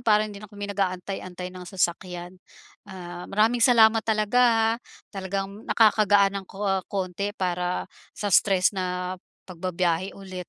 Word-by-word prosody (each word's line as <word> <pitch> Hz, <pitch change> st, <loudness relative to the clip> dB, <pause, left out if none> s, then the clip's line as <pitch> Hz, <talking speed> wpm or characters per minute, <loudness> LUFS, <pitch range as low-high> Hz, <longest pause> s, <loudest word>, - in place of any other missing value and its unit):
para 215 Hz, -3 st, +3 dB
hindi 205 Hz, -1 st, -8 dB
na 210 Hz, -, -11 dB
kami 205 Hz, 0 st, -7 dB
nag-aantay-antay 185 Hz, -1 st, -3 dB
ng 180 Hz, -1 st, -10 dB
sasakyan. 180 Hz, -1 st, -2 dB, 0.6 s
Ah, 175 Hz, -1 st, -8 dB
maraming 220 Hz, +4 st, +2 dB
salamat 225 Hz, -2 st, +6 dB
talaga 220 Hz, +2 st, +1 dB
ha. 225 Hz, -2 st, +4 dB, 0.4 s
Talagang 195 Hz, +1 st, -4 dB
nakakagaan 205 Hz, -3 st, +4 dB
ng 190 Hz, -, -16 dB
ko 195 Hz, -1 st, -1 dB
konti 200 Hz, +2 st, -3 dB
para 180 Hz, -1 st, -1 dB, 0.3 s
sa 205 Hz, -3 st, -2 dB
stress 190 Hz, 0 st, +4 dB
na 180 Hz, -1 st, -3 dB, 0.3 s
pagbibiyahe 180 Hz, 0 st, -2 dB
ulit. 185 Hz, -2 st, -8 dB
195 Hz, 130 wpm, -25 LUFS, 180-210 Hz, 0.6 s, salamat